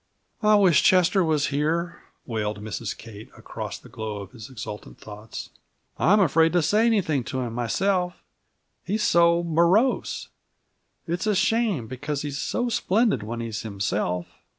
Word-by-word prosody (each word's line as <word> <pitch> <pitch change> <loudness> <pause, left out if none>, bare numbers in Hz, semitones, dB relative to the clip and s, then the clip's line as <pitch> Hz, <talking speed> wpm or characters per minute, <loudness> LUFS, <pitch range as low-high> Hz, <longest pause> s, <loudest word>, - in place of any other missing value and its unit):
"I 215 -1 +5
wish 185 -8 +5
Chester 185 +1 +4
was 155 -3 +1
here!" 165 +4 -1 0.2
wailed 105 -3 -3
Mrs. 110 +1 -5
Kate, 110 -1 -11
across - - -6
the - - -16
glow 110 -1 -5
of 100 -1 -8
his 110 -3 -11
exultant 110 -4 -8
thoughts. 105 +1 -9 0.5
"I'm 210 +5 +5
afraid 165 -2 +4
to 175 -2 +3
say 215 +8 +3
anything 165 - +1
to 130 - -3
him 120 -2 -4
myself, 180 - 0 0.7
he's 210 +3 -1
so 170 -4 +4
morose. 170 +9 +2 0.8
It's 175 +5 -2
a 210 - +2
shame, 215 - +1
because 140 +4 -4
he's 145 -1 -4
so 245 +9 -1
splendid 220 - +1
when 115 +2 -5
he's 110 -3 -4
himself." 100 -4 -2
155 Hz, 150 wpm, -25 LUFS, 110-185 Hz, 0.8 s, I